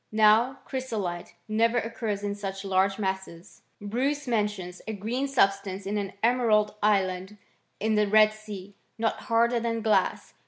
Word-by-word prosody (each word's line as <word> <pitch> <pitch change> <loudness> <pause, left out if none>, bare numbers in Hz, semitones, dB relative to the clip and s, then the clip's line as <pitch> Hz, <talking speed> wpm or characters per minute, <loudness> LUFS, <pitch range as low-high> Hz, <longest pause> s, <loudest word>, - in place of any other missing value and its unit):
Now 220 +4 +4
chrysolite 215 -10 -4
never 230 +2 +2
occurs 225 -3 -2
in 205 0 -1
such 195 -1 -6
large 195 0 +2
masses. 190 -4 -5 0.2
Bmce 265 +7 -2
mentions 205 -6 -2
a 220 - -3
green 230 +7 -2
substance 195 -6 +1
in 205 +1 -1
an 200 -1 -4
emerald 225 -3 +3
island 190 -1 +1 0.4
in 220 +1 +1
the 210 -1 +3
Red 215 +1 +5
Sea, 205 -2 -9 0.2
not 225 0 -1
harder 235 +1 +3
than 230 -1 -2
glass. 220 -2 +1
210 Hz, 145 wpm, -27 LUFS, 195-230 Hz, 0.4 s, Red